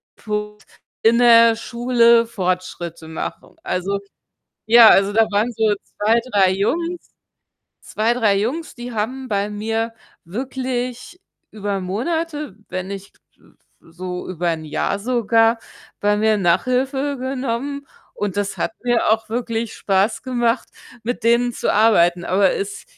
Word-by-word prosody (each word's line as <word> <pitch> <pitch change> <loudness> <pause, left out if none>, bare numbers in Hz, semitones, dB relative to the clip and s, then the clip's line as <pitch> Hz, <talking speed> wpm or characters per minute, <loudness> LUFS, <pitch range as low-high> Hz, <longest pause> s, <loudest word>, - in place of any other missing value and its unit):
Punkt 210 0 -5 0.4
in 230 +1 +5
der 230 -1 +7
Schule 235 0 +3
Fortschritte 180 -5 -4
machen. 160 - -7
Also, 195 +2 -2 0.7
ja 230 0 +9
also, 195 +1 +4
da 225 - +5
waren 210 +4 +1
so 220 -2 +2
2, 220 +3 +1
3 195 -4 +4
Jungs 335 - -2 0.7
2, 225 +2 0
3 220 -5 +2
Jungs, 275 +11 -3
die 240 0 -7
haben 255 +5 -3
bei 200 -1 0
mir 225 +2 -2 0.3
wirklich 255 - -4 0.3
über 205 -2 -3
Monate, 295 - -3
wenn 185 0 -4
nicht, 195 0 -9 0.2
äh, - - -30
äh, - - -23 0.3
so 180 +2 -7
über 175 -1 -2
'n 160 -1 -4
Jahr 155 +6 -2
sogar, 230 0 +2 0.4
bei 205 0 +2
mir 215 +1 +2
Nachhilfe 260 +9 0
genommen, 265 +2 -3 0.3
und 205 -1 -3
das 205 0 -2
hat - - -2
mir 240 -3 +2
auch 220 0 +1
wirklich 230 -1 -3
Spaß 195 +2 0
gemacht, 240 -2 0 0.3
mit 245 +1 -3
denen 240 +1 +3
zu - - -1
arbeiten. 175 -5 +3
Aber 190 +1 +3
es 200 0 -5
225 Hz, 135 wpm, -20 LUFS, 200-245 Hz, 0.7 s, ja